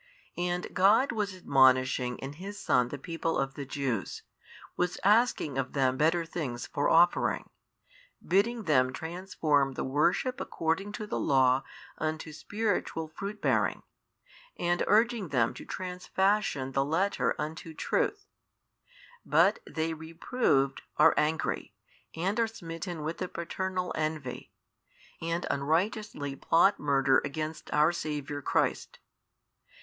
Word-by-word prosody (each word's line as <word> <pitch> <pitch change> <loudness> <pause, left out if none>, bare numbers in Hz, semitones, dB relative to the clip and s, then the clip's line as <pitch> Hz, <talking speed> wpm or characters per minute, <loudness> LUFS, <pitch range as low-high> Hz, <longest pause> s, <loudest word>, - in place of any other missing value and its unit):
And 175 0 -2
God 215 +8 +4
was 205 -4 -2
admonishing 130 -5 +3
in 135 +1 -7
His 195 +6 -8
Son 125 - +2
the 145 - -6
people 165 +2 -2
of 135 0 -1
the 140 -2 -7
Jews, 130 -8 -3 0.5
was 180 0 -1
asking 205 - +3
of 130 -1 -3
them 130 -2 +2
better 165 +4 +2
things 140 -8 -4
for 145 -1 0
offering, 170 +2 +3 0.8
bidding 220 +5 +2
them 130 -7 +3
transform 160 -4 0
the - - -3
worship 155 - +1
according 165 +5 -2
to 210 - -5
the - - -3
Law 130 -1 +3 0.4
unto 155 0 -3
spiritual 205 -4 -2
fruit 200 +6 -6
bearing, - - +1 0.7
and 175 0 0
|656 - - +3
urging 225 -2 +3
them 125 -6 +1
to - - -10
transfashion 185 -5 -1
the 135 - +2
Letter 165 +8 0
unto 160 +2 -5
truth: - - -1 1.0
but - - +3
they 160 0 -2
reproved 160 - 0 0.2
are - - +6
angry, 155 +1 -1 0.4
and 190 +7 -1
are 230 - +3
smitten 165 -5 -6
with 160 +2 -4
the 185 - -2
paternal 180 +2 -3
envy, 155 -4 -3 0.7
and 165 +1 -2
unrighteously 160 0 -1
plot 175 +8 +3
murder 135 -2 +3
against 155 +2 -5
our 150 +2 +4
Saviour 150 -3 -4
Christ. - - 0
160 Hz, 125 wpm, -29 LUFS, 140-190 Hz, 1.0 s, are